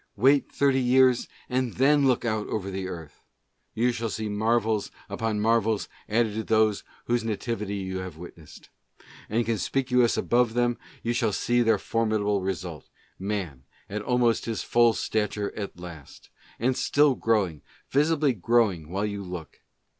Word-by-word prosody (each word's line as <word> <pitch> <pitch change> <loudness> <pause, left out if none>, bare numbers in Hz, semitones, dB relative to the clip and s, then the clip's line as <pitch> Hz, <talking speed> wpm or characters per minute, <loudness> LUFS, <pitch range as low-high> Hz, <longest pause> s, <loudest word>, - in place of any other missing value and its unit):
Wait 135 +6 +3
thirty 135 -2 +2
years, 125 0 +4 0.2
and 125 -2 -1
then 140 +2 +4
look 125 -2 +1
out 110 -2 -1
over 100 -2 -3
the 95 0 -4
earth! 80 -5 -9 0.5
You 120 +2 +2
shall 115 -1 -3
see 110 0 -3
marvels 110 0 +1 0.2
upon 105 +1 -2
marvels 110 -1 +1 0.2
added 110 0 +2
to 110 +1 -3 0.2
these 105 -2 -5 0.2
whose 120 -1 +1
nativity 110 -2 -3
you 95 -1 -4
have 95 -4 -7
witnessed; 85 -2 -13 0.6
and 115 +2 +1
conspicuous 125 +3 +1
above 120 -1 +2
them 120 0 +1 0.2
you 120 - 0
shall 115 -2 +1
see 120 +4 +1
their 115 -1 +3
for 115 0 -1
midable 105 -2 0
Result 90 -5 -5 0.2
— - - -41
Man 80 -11 -4 0.2
at 105 +2 -4
almost 120 0 +1
his 115 -2 -3
full 120 -1 +4
stature 105 -2 -2
at 100 -4 -6
last! 85 -5 -11
— - - -27
and 125 +3 +1
still 145 +1 +3
growing, 105 - 0 0.3
visibly 150 -1 +3
growing, 100 -6 +1
while 100 +4 -1
you 100 -1 -4
look. 90 -5 -8
110 Hz, 160 wpm, -26 LUFS, 100-120 Hz, 0.6 s, years